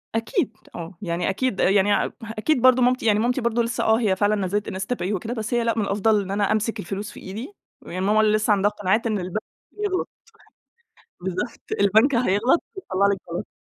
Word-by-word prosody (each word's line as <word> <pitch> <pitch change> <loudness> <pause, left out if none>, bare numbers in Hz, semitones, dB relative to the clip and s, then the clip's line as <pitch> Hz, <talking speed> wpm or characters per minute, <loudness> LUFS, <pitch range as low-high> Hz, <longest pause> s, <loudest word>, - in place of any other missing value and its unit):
أكيد 225 - -1 0.2
آه، 170 +1 -7
يعني 175 -2 -1
أكيد 205 +1 -1
يعني 200 +1 +4
أ - - -5
أكيد 225 +5 0
برضو 255 0 +6
مامتي 250 0 +2
يعني 210 -2 +4
مامتي 245 +4 +1
برضو 235 0 +1
لسّه 230 0 -1
آه، 220 +1 +3
هي 210 -5 +2
فعلًا 205 +2 +2
نزلت 205 +1 -1
إنستا 190 +4 -3
باي 200 -2 -2
وكده، 220 +5 -3
بس 220 -1 -4
هي 240 -1 +2
لأ، 230 0 0
من 220 - +1
الأفضل 205 +1 +2
إن 195 0 -6
أنا 205 0 +1
أمسك 215 +1 0
الفلوس 200 +4 -5
في - - -12
إيدي. 220 - -7 0.3
هي 185 +2 -4
ماما 210 +3 +3
لسّه 215 0 +2
عندها 205 +1 +2
قناعات 210 +3 0
إن 215 -2 0
البنك 185 +4 -3 0.3
بيغلط. 410 -3 -2 1.1
بالضبط 185 +6 -4 0.2
البنك 220 +7 +4
هيغلط 235 - +2
ويطلع 200 - 0
لِك - - -3
غلط. 170 - -4
215 Hz, 200 wpm, -23 LUFS, 195-235 Hz, 1.1 s, برضو